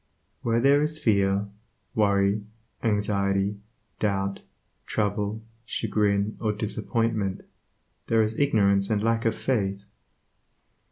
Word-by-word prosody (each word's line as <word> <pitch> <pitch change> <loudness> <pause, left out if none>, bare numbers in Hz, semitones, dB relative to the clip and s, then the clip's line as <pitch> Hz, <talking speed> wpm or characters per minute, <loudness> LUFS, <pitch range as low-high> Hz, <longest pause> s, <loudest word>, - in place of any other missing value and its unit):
Where 115 0 +1
there 140 +3 +5
is 155 +1 +1
fear, 100 -7 +2 0.5
worry, 100 -1 +2 0.4
anxiety, 100 -2 +1 0.4
doubt, 100 -1 -1 0.5
trouble, 105 +1 -1 0.2
chagrin, 105 -2 0
or 110 -2 +1
disappointment, 110 -1 -1 0.7
there 115 -1 +4
is 110 +1 -2
ignorance 100 -8 +3
and 105 -1 +1
lack 115 0 +1
of 115 -1 +2
faith. 100 -6 -1
105 Hz, 100 wpm, -26 LUFS, 100-115 Hz, 0.7 s, there